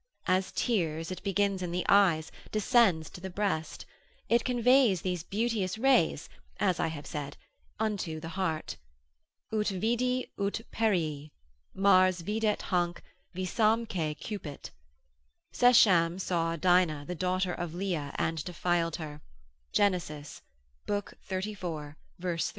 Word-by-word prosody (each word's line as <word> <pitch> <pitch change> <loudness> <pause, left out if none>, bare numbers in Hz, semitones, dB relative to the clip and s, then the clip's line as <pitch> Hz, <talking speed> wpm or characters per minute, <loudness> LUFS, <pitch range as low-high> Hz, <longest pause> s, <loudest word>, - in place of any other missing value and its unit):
As 185 +1 +1
tears, 165 -7 -1
it 185 - -6
begins 200 -1 0
in 180 - -3
the 180 +1 -2
eyes, 175 -6 +4 0.2
descends 215 - +3
to 180 - -10
the 190 - -5
breast; 185 -4 -2 0.4
it 235 0 +3
conveys 245 -5 +3
these 180 -3 -1
beauteous 210 0 -1
rays, 235 - +3 0.3
as 185 -4 +1
I - - +1
have 150 -3 -6
said, 145 -2 -5 0.4
unto 200 -7 -2
the 160 - -7
heart. 165 -4 -2 0.8
Ut 210 -1 +1
vidi 240 +6 0
ut 200 +2 -1
perii. 160 -10 0 0.5
Mars 185 -2 +4
videt 210 +2 0
hanc, 175 -1 -1 0.3
visamque 185 -4 0
cupit. 180 -10 -7 0.8
Schechem 185 -8 +5
saw 165 -3 0
Dinah 175 -4 +2
the 180 - -4
daughter 185 +1 0
of 175 -2 -5
Leah, 175 -7 -2
and 160 -2 -1
defiled 175 -1 0
her, 150 -2 -7 0.5
Gen. 205 -2 +4
xxxiv. 150 -5 -7 1.0
3. 175 -7 -5
185 Hz, 120 wpm, -30 LUFS, 165-210 Hz, 1.0 s, Schechem